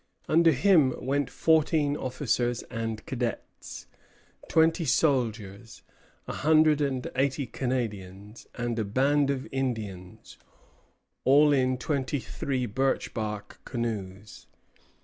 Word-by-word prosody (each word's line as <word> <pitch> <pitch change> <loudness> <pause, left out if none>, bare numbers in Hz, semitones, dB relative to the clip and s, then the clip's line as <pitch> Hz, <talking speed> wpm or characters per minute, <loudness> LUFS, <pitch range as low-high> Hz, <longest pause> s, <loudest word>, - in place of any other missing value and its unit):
Under 165 +1 +5
him 150 -3 +4
went 140 +2 -1
fourteen 155 -2 +2
officers 125 -3 -1
and 115 -1 -4
cadets, 120 -4 -5 0.6
twenty 160 +2 +3
soldiers, 115 -8 -1 0.4
a - - -4
hundred 155 0 +3
and 135 -3 -1
eighty 135 +1 0
Canadians, 105 -5 -5
and 120 -1 -2
a - - +1
band 140 +7 +2
of 135 -1 -2
Indians, 110 -9 -5 0.8
all 145 +2 +5
in 130 -2 +1
twenty 140 +1 -2
three 130 +2 -3
birch 130 +5 -1
bark 105 -2 -5
canoes. 105 -4 -5
130 Hz, 105 wpm, -27 LUFS, 115-145 Hz, 0.8 s, Under